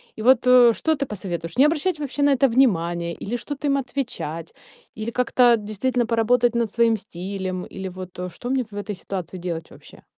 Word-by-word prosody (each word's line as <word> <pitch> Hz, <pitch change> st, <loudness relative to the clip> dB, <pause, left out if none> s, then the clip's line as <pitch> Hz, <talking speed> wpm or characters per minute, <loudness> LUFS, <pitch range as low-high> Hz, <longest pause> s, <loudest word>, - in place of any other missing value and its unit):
И 220 Hz, -, -7 dB
вот, 250 Hz, 0 st, +4 dB
э, 250 Hz, -2 st, +7 dB
что 320 Hz, +6 st, 0 dB
ты 275 Hz, 0 st, -2 dB
посоветуешь? 175 Hz, -5 st, -5 dB
Не 275 Hz, -, +7 dB
обращать 315 Hz, +2 st, +1 dB
вообще 285 Hz, 0 st, -2 dB
на 285 Hz, -, +5 dB
это 270 Hz, +2 st, +4 dB
внимания? 170 Hz, -9 st, +1 dB
Или 235 Hz, +4 st, -3 dB
что-то 290 Hz, +3 st, -5 dB
им 275 Hz, 0 st, +2 dB
отвечать? 235 Hz, -, -4 dB, 0.4 s
Или 220 Hz, +2 st, -4 dB
как-то 245 Hz, -1 st, +4 dB
действительно 225 Hz, +4 st, -1 dB
поработать 235 Hz, +1 st, +2 dB
над 230 Hz, -3 st, 0 dB
своим 230 Hz, -1 st, +3 dB
стилем? 185 Hz, -1 st, -5 dB
Или 190 Hz, 0 st, -5 dB
вот, 185 Hz, 0 st, -9 dB
э, 180 Hz, 0 st, -3 dB
что 245 Hz, -, -6 dB
мне 260 Hz, -1 st, +1 dB
в 205 Hz, -, -8 dB
этой 205 Hz, 0 st, -4 dB
ситуации 185 Hz, -1 st, -6 dB
делать 170 Hz, -2 st, -5 dB
вообще? -, -, -16 dB
230 Hz, 195 wpm, -23 LUFS, 185-255 Hz, 0.4 s, э